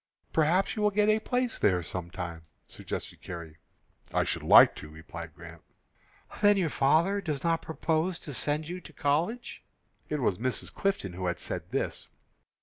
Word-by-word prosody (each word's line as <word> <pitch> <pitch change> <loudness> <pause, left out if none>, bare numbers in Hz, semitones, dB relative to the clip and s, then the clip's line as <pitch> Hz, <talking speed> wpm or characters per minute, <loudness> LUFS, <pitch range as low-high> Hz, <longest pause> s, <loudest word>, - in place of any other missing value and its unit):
"Perhaps 165 +5 +2
you 215 - -2
will 210 - +4
get 210 +1 +2
a 215 0 +4
place 250 +1 -1
there 90 -4 +3
some 85 0 -5
time," 85 -3 -6 0.2
suggested - - -6
Carrie. 85 -3 -8 0.5
"I - - +2
should - - -2
like - - +8
to," - - -9
replied 80 +1 -9
Grant. 85 -1 -11 0.8
"Then 205 -1 +6
your 180 -4 +1
father 170 +9 +3
does 150 -6 -3
not 165 -1 +1
propose 160 +2 -1
to 145 - -4
send 150 +4 0
you 180 +2 -5
to - - -13
college?" 170 +12 -1 0.5
It 150 - -1
was 105 -7 +1
Mrs. 130 +1 -2
Clifton 195 - -1
who 90 0 -1
said - - -5
this. - - -2
150 Hz, 165 wpm, -29 LUFS, -, 0.8 s, like